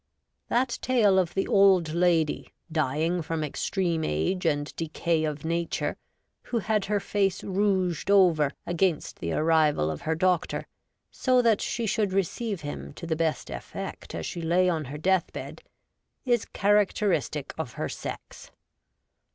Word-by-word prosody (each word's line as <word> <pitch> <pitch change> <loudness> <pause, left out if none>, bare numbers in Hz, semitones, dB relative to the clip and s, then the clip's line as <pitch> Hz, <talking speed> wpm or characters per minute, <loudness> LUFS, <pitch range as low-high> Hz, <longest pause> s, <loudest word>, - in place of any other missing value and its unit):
That 245 +1 +1
tale 215 -7 +4
of 175 -2 -1
the 195 - 0
old 190 -5 +4
lady, 170 -3 +1 0.2
dying 155 +3 0
from 160 0 -3
extreme 165 +2 -1
age 80 - 0
and 145 0 -1
decay 165 0 -1
of 150 0 -4
nature, 170 +1 -1 0.5
who 240 - -2
had 215 -2 0
her 205 0 0
face 195 -2 0
rouged 190 -3 0
over 175 -7 +5 0.2
against 175 -2 0
the 85 -1 -3
arrival 155 - +2
of 75 - -6
her 160 - -1
doctor, 180 0 0 0.5
so 255 -1 +2
that 225 -3 +3
she 235 - -2
should 210 -2 0
receive 195 +1 -1
him 145 -1 -6
to - - -8
the 160 -1 -1
best 160 -1 -1
effect - - -7
as 80 -1 -4
she 170 - -5
lay 175 +3 +3
on 160 -4 0
her 140 +3 -6
death 185 +2 +1
bed, - - -7 0.6
is 240 -4 +2
characteristic 200 -7 +1
of 125 -7 -4
her - - -3
sex. - - -8
175 Hz, 150 wpm, -27 LUFS, 155-195 Hz, 0.6 s, over